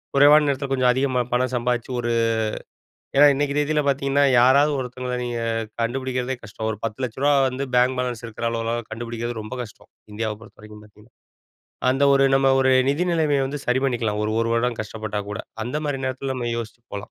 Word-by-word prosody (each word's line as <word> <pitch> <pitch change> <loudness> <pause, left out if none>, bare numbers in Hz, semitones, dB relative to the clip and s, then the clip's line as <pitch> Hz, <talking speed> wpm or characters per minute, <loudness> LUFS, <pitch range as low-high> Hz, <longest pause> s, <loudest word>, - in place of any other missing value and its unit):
குறைவான 145 +2 +7
நேரத்துல 140 0 -1
கொஞ்சம் 130 -2 +3
அதிகமா 130 -1 +1
பணம் 130 +1 +1
சம்பாதிச்சு 120 0 -1
ஒரு, 120 0 -1 1.1
ஏன்னா 145 +1 +8
இன்னிக்கு 140 0 -1
தேதில 150 0 +1
பாத்தீங்கன்னா, 140 +1 +2 0.2
யாராவது 140 +4 +5
ஒருத்தங்கள 125 0 -4
நீங்க 120 -1 -3 0.4
கண்டுபிடிக்கிறதே 130 +1 -2
கஷ்டம், 110 +2 -6
ஒரு 105 - -5
ரூ.1000000 130 +5 0
வந்து 135 +2 -4
பேங்க் 125 +1 +3
பேலன்ஸ் 125 -2 -3
இருக்குற 115 +1 -5
அளவுலாம் 115 +1 -2
கண்டுபிடிக்கிறது 120 0 -5
ரொம்ப 110 +4 -7
கஷ்டம். 105 - -13 0.2
இந்தியாவ 110 0 -3
பொறுத்தவரைக்கும் 105 -1 -14
பாத்தீங்கன்னா. 105 0 -21 0.8
அந்த 135 +2 +1
ஒரு 135 0 +4
நம்ம 135 0 +3
ஒரு 130 0 +3 0.2
நிதி 150 +6 +1
நிலமைய 155 -4 +2
வந்து 145 +2 -4
சரி 125 +1 +2
பண்ணிக்கலாம், 115 -5 -1
ஒரு, 110 - -1
ஒரு 115 0 0
வருடம் 120 0 0
கஷ்டப்பட்டா 110 -1 -5
கூட 105 - -5 0.3
அந்தமாரி 145 +1 -2
நேரத்துல 130 +1 -3
நம்ம 120 -2 -3
யோசிச்சு 115 +1 -7
போலாம். 100 - -5
125 Hz, 170 wpm, -23 LUFS, 115-135 Hz, 1.1 s, ஏன்னா